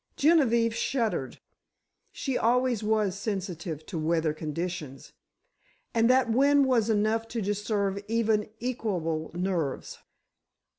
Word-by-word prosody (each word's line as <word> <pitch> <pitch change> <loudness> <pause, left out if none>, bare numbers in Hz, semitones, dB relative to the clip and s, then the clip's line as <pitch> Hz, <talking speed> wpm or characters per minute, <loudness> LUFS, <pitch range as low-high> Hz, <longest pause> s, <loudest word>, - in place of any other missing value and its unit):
Genevieve 240 -8 +3
shuddered—she 235 - -4
always 245 -1 +2
was 210 -3 +1
sensitive 180 -6 -4
to 170 - -5
weather 160 0 +1
conditions, 155 -3 -5 0.8
and 230 0 +3
that 255 -1 +4
wind 280 +3 +4
was 235 -4 +2
enough 220 +1 +1
to 230 - -4
disturb 200 -1 -1
even 220 -1 +1
equable 180 -10 -2
nerves. 175 -6 -2
210 Hz, 100 wpm, -28 LUFS, 175-230 Hz, 0.8 s, that